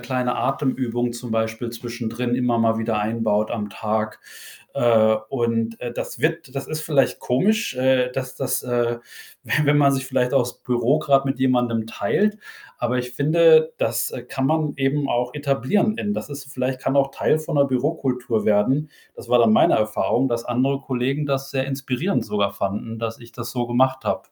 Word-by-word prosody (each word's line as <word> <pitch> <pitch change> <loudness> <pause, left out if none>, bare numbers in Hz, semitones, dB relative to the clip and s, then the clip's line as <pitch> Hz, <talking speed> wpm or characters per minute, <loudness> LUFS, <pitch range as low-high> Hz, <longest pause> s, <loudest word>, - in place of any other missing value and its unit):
kleine 125 -1 -1
Atemübung 125 -3 -1
zum 120 -1 -6
Beispiel 110 +1 -2
zwischendrin 120 +1 -3
immer 125 -2 +1
mal 115 0 +2
wieder 115 -1 -1
einbaut 110 -1 0
am 105 -2 -3
Tag, 110 +1 -3 0.5
äh, 110 -2 +4
und, 115 -3 -1
äh, 120 -1 -4
das - - -6
wird 165 -4 -1
das 135 - -4
ist 155 0 -3
vielleicht 145 -4 +1
komisch, 205 - +1
äh, 130 -1 +2
dass 130 0 -5
das, 135 - -1
äh 120 -1 0 0.4
we - - -6
wenn 145 0 +4
man 140 -1 +5
sich 135 -1 -1
vielleicht 125 -1 0
auch 135 - +5
das 120 0 -6
Büro 125 +3 +1
gerade 140 -3 +3
mit 135 - -2
jemandem 120 -4 +1
teilt, 210 - 0 0.4
aber 120 +1 0
ich 125 0 -4
finde, 160 +2 +5
das, 115 +1 0
äh, 120 - -6
kann 130 +2 -4
man 155 -1 0
eben 140 +1 0
auch 125 +1 0
etablieren 145 - +1
in 205 - -1
das - - -5
ist 140 0 -8
vielleicht 130 0 -2
kann 135 - -1
auch 135 0 +3
Teil 155 +3 +1
von 155 - -4
'ner 140 - +5
Bürokultur 130 -4 -1
werden. 130 +9 +2 0.3
Das - - -11
war 120 -1 +5
dann 115 -2 +5
meine - - +5
Erfahrung, 110 +4 +1
dass 115 -1 -2
andere 135 +3 0
Kollegen 135 +3 -1
das 135 -1 -2
sehr 135 -1 -1
inspirierend 135 +6 -1
sogar 100 -1 0
fanden, 105 +3 -4
dass 115 0 -4
ich 115 -1 -15
das 120 -1 -6
so 120 -2 -2
gemacht 130 +2 +1
habe. - - 0
125 Hz, 190 wpm, -22 LUFS, 115-140 Hz, 0.5 s, man